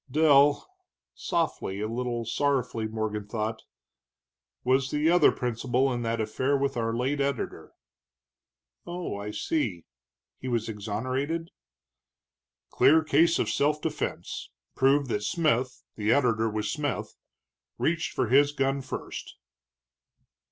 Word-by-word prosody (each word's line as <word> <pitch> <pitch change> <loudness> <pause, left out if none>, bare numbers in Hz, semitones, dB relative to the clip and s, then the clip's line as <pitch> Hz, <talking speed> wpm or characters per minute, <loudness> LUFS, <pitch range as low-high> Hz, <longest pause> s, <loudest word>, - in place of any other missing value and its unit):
Dell" 145 0 +4 0.5
softly, 160 - -2
a 105 - -1
little 120 0 -3
sorrowfully, 125 -3 0
Morgan 110 -1 -3
thought 110 +1 -3 1.0
"was 130 +1 +2
the 150 +3 +2
other 180 - +6
principal 125 +2 0
in 120 - -2
that 115 0 -1
affair 130 +6 0
with 140 0 -1
our 115 -1 0
late 135 +4 0
editor." 140 -2 -3 1.1
"Oh, 175 - -4
I 100 +1 -5
see. 105 - -2 0.5
He 130 - -6
was 120 -3 -1
exonerated?" 130 +10 -3 1.2
"Clear 160 +2 +5
case 160 +2 +4
of - - 0
self 150 +1 +1
defense, 155 -1 -4 0.3
proved 140 +2 +3
that 105 - -1
Smith 130 +2 0
the 105 0 0
editor 115 -5 +3
was 105 0 -2
Smith 145 -3 -3 0.6
reached 160 0 0
for - - 0
his 145 +3 +5
gun 135 0 0
first." 130 - -7
130 Hz, 120 wpm, -27 LUFS, 115-145 Hz, 1.2 s, other